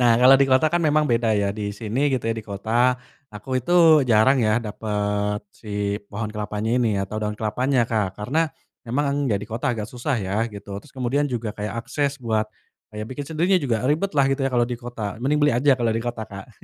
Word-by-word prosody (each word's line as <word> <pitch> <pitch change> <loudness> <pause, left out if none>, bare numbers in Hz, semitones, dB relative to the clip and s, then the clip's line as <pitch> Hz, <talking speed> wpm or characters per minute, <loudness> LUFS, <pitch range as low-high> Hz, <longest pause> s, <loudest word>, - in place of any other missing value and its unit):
nah 120 -2 +5
kalo 130 +2 +8
di 135 - +5
kota 130 +4 +5
kan 170 +2 +1
memang 155 -1 +3
beda 115 -3 +1
ya 100 0 0
di 105 -1 -3
sini 115 +7 -1
gitu 130 -4 -1
ya 115 - 0
di 110 - -6
kota, 115 +5 +1 0.3
aku 130 +5 -3
itu 165 -1 +6
jarang 125 +2 +4
ya 110 0 +3
dapet 105 -2 -2
si 105 -2 -3 0.2
pohon 110 +2 -3
kelapanya 105 +1 -3
ini 115 -5 +1
atau 100 +3 -3
daun 105 0 -3
kelapanya 120 +3 +1
Kak 105 -5 -1
karena, 155 +10 0 0.3
emang 140 +2 -1
ya 100 - +2
di 105 - -8
kota 115 +2 -2
agak 110 -3 -3
susah 125 +3 -2
ya 100 +2 -1
gitu 100 -1 -8
terus 150 - -18
kemudian 130 +2 -1
juga 115 -4 -3
kayak 105 +3 -5
akses 140 -1 -1
buat, 110 -3 -1 0.4
kayak 105 0 -6
bikin 145 +2 -6
sendirinya 175 +3 +2
juga 120 -3 0
ribet 155 +8 +1
lah 140 -5 +3
gitu 135 0 0
ya 135 - +1
kalo 120 -1 +2
di 120 - -3
kota 120 -4 -6
mending 145 +3 +2
beli 145 -4 +3
aja 130 +2 +3
kalo 115 -2 +1
di 115 - -1
kota 120 -2 -4
Kak 100 0 -10
115 Hz, 215 wpm, -23 LUFS, 105-135 Hz, 0.4 s, kalo